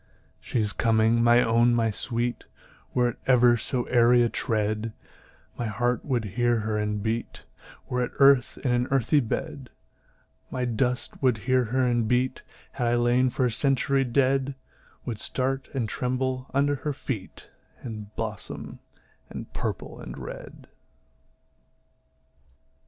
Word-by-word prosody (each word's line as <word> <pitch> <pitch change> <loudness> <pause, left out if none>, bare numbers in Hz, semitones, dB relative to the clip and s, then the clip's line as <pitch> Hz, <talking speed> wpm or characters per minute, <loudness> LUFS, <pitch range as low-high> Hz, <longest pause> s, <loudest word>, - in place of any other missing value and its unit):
She 120 - -2
is 105 -2 +1
coming, 115 0 +3
my 120 +1 +6
own, 120 +1 +3
my 115 -1 +2
sweet; 120 +3 -2 0.5
Were 125 -1 +3
it 120 - -7
ever 125 -2 +6
so 120 +2 -2
airy 120 0 +4
a 120 - +2
tread, 110 0 -1 0.7
My 120 - -1
heart 120 +3 0
would 125 -6 -1
hear 120 +3 +1
her 110 0 -2
and 105 -1 -1
beat, 115 +1 -3 0.4
Were 125 -1 0
it - - -9
earth 140 -2 +5
in 125 - +2
an 120 +1 +1
earthy 135 +3 +3
bed; 125 +1 -4 0.8
My 125 -1 -2
dust 125 +1 -1
would 125 -4 +3
hear 130 -1 +3
her 130 +4 0
and 120 -2 +1
beat, 125 +2 +1 0.3
Had 120 -3 -2
I 120 - +2
lain 120 +2 +3
for 125 +1 0
a 125 - +1
century 135 +2 +2
dead; 135 +2 +1 0.5
Would 115 -4 -4
start 130 +3 -1
and 125 -5 -2
tremble 130 +2 -2
under 140 +1 +1
her 150 +2 -3
feet, 115 -8 -6 0.3
And 110 -4 -6
blossom 110 -2 -6 0.5
in - - -7
purple - - -4
and - - -8
red. - - -9
120 Hz, 145 wpm, -26 LUFS, 115-130 Hz, 0.8 s, my